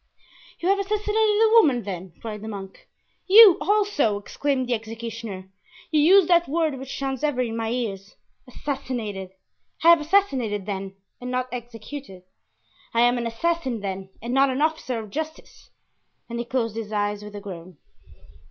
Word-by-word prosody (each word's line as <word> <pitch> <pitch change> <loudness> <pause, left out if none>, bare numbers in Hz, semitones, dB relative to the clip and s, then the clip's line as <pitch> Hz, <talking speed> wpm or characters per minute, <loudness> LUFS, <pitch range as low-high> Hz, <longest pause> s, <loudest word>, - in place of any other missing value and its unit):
You 350 - 0
have 395 0 +3
assassinated 420 +1 -1 0.3
a 445 - +5
woman, 290 - +5
then?" 185 -3 -6
cried 215 -2 -6
the 220 - -7
monk. 195 -3 -8 0.4
"You 405 -2 +9
also!" 400 - +2
exclaimed 260 +5 -2
the 245 - 0
executioner, 225 -4 -6 0.4
"you 305 -2 +4
use 365 +3 +6
that 345 -1 +4
word 310 -3 0
which 265 0 -7
sounds 270 0 -3
ever 295 -4 0
in 230 -2 -2
my 225 -1 -2
ears—'assassinated!' 230 0 -5 0.5
I 335 - +7
have 340 -2 +7
assassinated, 270 - +1
then, 195 -1 -5 0.3
and 250 - -5
not 255 0 -2
executed! 240 -3 -8 0.7
I 230 - +4
am 245 +1 +4
an 235 - -2
assassin, 260 -1 -1
then, 190 -1 -5
and 240 +1 -3
not 270 +1 +4
an 265 +3 0
officer 310 -6 -1
of 215 -3 -7
justice!" 315 +3 -7 0.6
and 235 0 -5
he 240 - -3
closed 235 -3 -2
his 220 -2 -5
eyes 205 0 -1
with 210 0 -10
a - - -5
groan. 185 -4 -9
240 Hz, 160 wpm, -24 LUFS, 210-300 Hz, 0.7 s, You